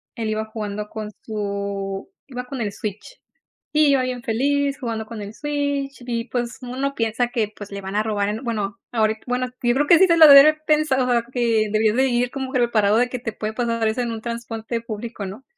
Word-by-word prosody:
él 225 -3 -3
iba 215 0 -1
jugando 210 -1 -5
con 215 -1 -6
su 200 - -4 0.2
iba 250 -2 -6
con 265 +1 -6
el 210 -3 -2
Switch, 215 - -7 0.5
iba 285 -3 +4
bien 255 -1 -3
feliz 280 +5 0
jugando 230 -5 -4
con 230 -1 -7
el 205 +1 -8
Switch 285 -2 -2
y, 230 -1 -2
pues, 240 -1 -3
uno 265 +3 -3
piensa 230 +1 0
que, 220 -3 -1
pues, 205 -1 -9
le 200 - -5
van 195 +1 -5
a 210 - +3
robar 205 -2 -1
en 220 +5 -4
bueno, 205 -4 -3
ahorita 220 -1 +1
bueno, 250 0 0 0.2
yo 240 0 +3
creo 290 +2 +2
que 340 - +7
sí 380 - +7
se 335 - +3
lo 320 -1 +10
debió 280 -1 +11
de 305 - +6
haber 310 0 -9
pensado, 290 -5 +2
a 235 -1 +2
que 230 -4 +2
debió 215 0 +3
de 265 +2 +3
ir 245 0 +1
como 265 -1 -5
que 255 - +1
preparado 220 -3 +3
de 245 +1 +3
que 250 0 -4
te 230 -2 -5
puede 215 0 -4
pasar 230 -1 0
eso 220 +3 -1
en 235 -1 -2
un 225 - -5
transporte 230 0 -4
público, 225 -1 -6
¿no? 205 +8 -9
235 Hz, 225 wpm, -22 LUFS, 215-260 Hz, 0.5 s, debió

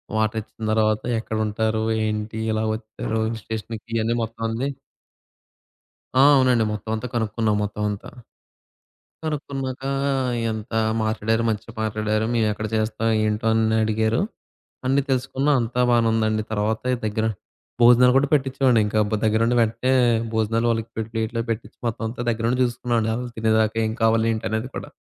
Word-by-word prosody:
Water 110 +1 +1
ఇచ్చిన 110 +1 -8
తర్వాత 110 -1 +2 0.2
ఎక్కడుంటారు? 110 0 -1 0.2
ఏంటి? 105 +1 -3
ఎలా 110 0 0
వచ్చారు 110 0 -4
హిల్ 110 0 -3
స్టేషన్‌‌కి 110 0 -6
ఇయన్నీ 115 +1 +1
మొత్తం 115 0 -7
అన్ని 120 +5 -2 1.5
ఆ! - - +7
అవునండి. 125 -4 +4
మొత్తం 105 +1 -5
అంతా 120 +3 -4
కనుక్కున్నాం, 110 -1 0
మొత్తం 105 +1 -3
అంతా. 105 -1 -6 1.1
కనుక్కున్నాక 135 -4 -4 0.7
ఎంత 110 -1 -6 0.3
మాట్లాడారు. 110 +1 0
మంచిగా 110 +1 -4
మాట్లాడారు. 110 0 0
మేమెక్కడ 110 -2 0
చేస్తాం? 110 +1 0 0.2
ఏంటో? 110 +2 0
అన్ని 110 0 +2
అడిగారు. 110 +4 +1 0.7
అన్నీ 135 +2 +3
తెలుసుకున్నాం 135 +2 +1
అంతా 120 +2 -1
బానే 120 -1 +4
ఉందండి. 110 -1 +1
తర్వాతే 110 +4 0
దగ్గర 110 +1 -1 0.6
భోజనాలు 125 +1 +7
గూడా 140 +1 +4
పెట్టించామండి 130 -4 +3
ఇంకా 105 +1 0
బ - - -1
దగ్గరుండి 115 +2 +2
వెంటనే 115 +3 +1 0.4
భోజనాలు 110 +1 +1
వాళ్ళకి 115 0 -2
పె - - 0
ప్లేట్‌లో 115 +1 -2
పెట్టించి 115 0 -4
మొత్తం 115 0 -3
అంతా 120 +2 -6
దగ్గర 115 -1 -2
ఉండి 125 +1 0
జూసుకున్నామండి. 120 -2 0
వాళ్ళు 125 +1 -4
తినేదాకా 110 0 +2
ఏం 110 - -1
కావాలి? 115 0 +3
ఏంటి? 110 - -4
అనేది 110 +3 -2
కూడా. - - -6
110 Hz, 145 wpm, -23 LUFS, 110-120 Hz, 1.5 s, ఆ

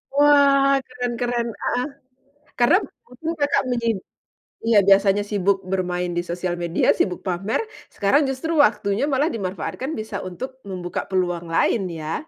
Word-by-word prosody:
Wah, 280 -1 +5
keren 245 -1 -3
keren, 240 -1 -1
heeh, 250 +1 0 0.7
karena 245 +8 +5 0.3
waktu 250 +6 -8
Kakak 285 0 +2
menyin 235 -3 0 0.7
iya, 225 -2 +5
biasanya 195 +1 +5
sibuk 200 -1 +1
bermain 180 -1 -1
di 175 - +1
sosial 175 0 -3
media, 170 0 -1
sibuk 180 - 0
pamer, 190 +3 -2 0.3
sekarang 280 +9 +2
justru 270 +4 -3
waktunya 200 -3 +1
malah 290 +2 +1
dimanfaatkan 200 - -4
bisa 220 -6 -5
untuk 255 +9 -7
membuka 180 -3 -4
peluang 175 -3 -1
lain 195 +5 +2 0.2
ya? 155 +1 -3
215 Hz, 135 wpm, -22 LUFS, 185-260 Hz, 0.7 s, Wah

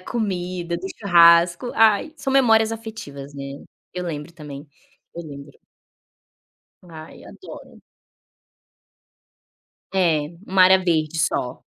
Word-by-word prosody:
comida, 180 -5 -4
do 185 - -7
churrasco. 170 +2 +4
Ai, 225 +7 +3
são 270 - -3
memórias 225 -4 +3
afetivas, 215 -12 -9
né. 140 0 -8 0.3
Eu 180 0 -5
lembro 160 -1 -6
também, 150 -3 -10 0.5
eu 170 - -7
lembro. 140 -2 -11 1.3
Ai, 160 -3 -13
adoro. - - -13 2.1
É, 175 -5 +2 0.3
uma 190 0 +3
área 190 +1 +6
verde 165 -3 -1
só. 130 -6 -2
175 Hz, 100 wpm, -21 LUFS, 155-200 Hz, 2.1 s, área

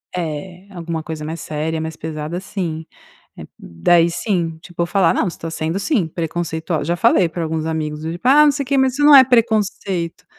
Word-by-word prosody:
É. 175 +3 -5
Alguma 170 -3 -5
coisa 155 -1 -6
mais 160 +2 -5
séria, 155 +1 -3
mais 160 0 -5
pesada, 155 +1 -5
assim, 175 -4 -5 0.5
é - - -9
hum - - -10
daí 165 - +2
sim, 170 -3 -2
tipo 175 -2 -9
eu - - 0
falar: 190 -2 +2
"Não, - - 0
você 170 - -7
está 165 - -6
sendo 160 +3 -2
sim, 200 - 0
preconceitual", 160 0 -3
já 170 +3 -1
falei 175 +1 +3
para 170 +1 -5
alguns 160 -1 -2
amigos, 155 -2 -3
do 160 +1 -4
tipo: 175 +7 -7
"Ah, 295 +3 +7
não 290 - +4
sei 280 - -2
o - - -8
que, 275 +1 +1
mas 265 -1 +3
isso 290 +2 0
não 295 0 +8
é 270 - +11
preconceito.", 210 -7 0
170 Hz, 220 wpm, -19 LUFS, 160-195 Hz, 0.5 s, é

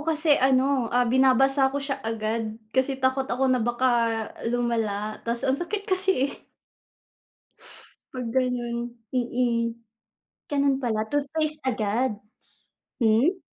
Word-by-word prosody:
kasi 315 -2 +3
ano, 265 -1 +2
ah, 245 +1 +2
binabasa 265 +2 +4
ko 275 - -5
siya 275 -1 -3
agad 220 0 -3 0.2
kasi 260 +1 +1
takot 260 0 0
ako 260 +1 +1
na 255 - +2
baka 240 +3 +1 0.6
lumala 225 -3 -1
tas 235 0 -1
ang 265 +1 +1
sakit 395 +4 -3
kasi, 375 -9 +1
eh. - - -14 1.7
'Pag 255 -2 -5
gano'n, 245 -2 0 0.3
mm. 245 -1 0 0.9
Ganun 280 -2 +2
pala, 220 -3 -1
toothpaste 300 +3 +1
agad. 230 0 0 0.9
Hmm? 250 - +3
255 Hz, 115 wpm, -25 LUFS, 235-275 Hz, 1.7 s, binabasa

